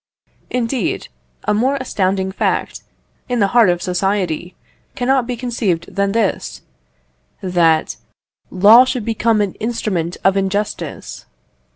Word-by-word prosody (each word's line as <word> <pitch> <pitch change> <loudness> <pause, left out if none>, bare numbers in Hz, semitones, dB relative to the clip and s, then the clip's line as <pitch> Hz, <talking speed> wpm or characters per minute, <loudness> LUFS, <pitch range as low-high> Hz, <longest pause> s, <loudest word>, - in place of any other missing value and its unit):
Indeed, 245 -3 -2 0.3
a - - +1
more 255 +6 +1
astounding 190 -7 -1
fact, 190 - -2 0.5
in 245 -1 0
the 200 -2 +3
heart 235 -5 +6
of 175 0 0
society, 180 -2 -1 0.4
cannot 255 0 +1
be 250 - -2
conceived 225 -9 -2
than 200 0 +1
this: 220 -2 -1 0.8
That 170 -4 +2 0.5
law 210 +6 +7
should 255 -1 -2
have - - -10
become 225 -1 +1
an 200 -3 -1
instrument 205 -7 -2
of 195 0 +3
injustice. 195 +2 -3
205 Hz, 125 wpm, -18 LUFS, 185-235 Hz, 0.8 s, law